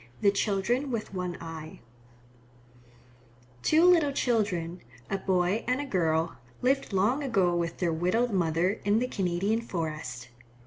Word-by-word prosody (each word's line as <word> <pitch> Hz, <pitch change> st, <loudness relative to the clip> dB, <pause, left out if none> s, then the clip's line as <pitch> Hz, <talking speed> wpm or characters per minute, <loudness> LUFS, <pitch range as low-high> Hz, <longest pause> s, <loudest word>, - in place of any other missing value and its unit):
THE 200 Hz, -, +5 dB
CHILDREN 210 Hz, +7 st, 0 dB
WITH 230 Hz, -5 st, -4 dB
ONE 180 Hz, -2 st, -3 dB
EYE 160 Hz, -1 st, -8 dB, 1.8 s
Two 315 Hz, -, +4 dB
little 335 Hz, -5 st, +5 dB
children, 195 Hz, -10 st, 0 dB, 0.3 s
a 195 Hz, -, 0 dB
boy 190 Hz, +3 st, +1 dB
and 250 Hz, +2 st, +1 dB
a 290 Hz, -, -2 dB
girl, 165 Hz, -, 0 dB, 0.3 s
lived 270 Hz, 0 st, +1 dB
long 210 Hz, +9 st, +2 dB
ago 195 Hz, -9 st, +2 dB
with 170 Hz, -1 st, -2 dB
their 170 Hz, -3 st, 0 dB
widowed 185 Hz, +9 st, +1 dB
mother 180 Hz, +2 st, +1 dB
in 205 Hz, +1 st, +3 dB
the 250 Hz, +2 st, +1 dB
Canadian 195 Hz, +2 st, 0 dB
forest. 155 Hz, -, -5 dB
195 Hz, 135 wpm, -28 LUFS, 170-235 Hz, 1.8 s, THE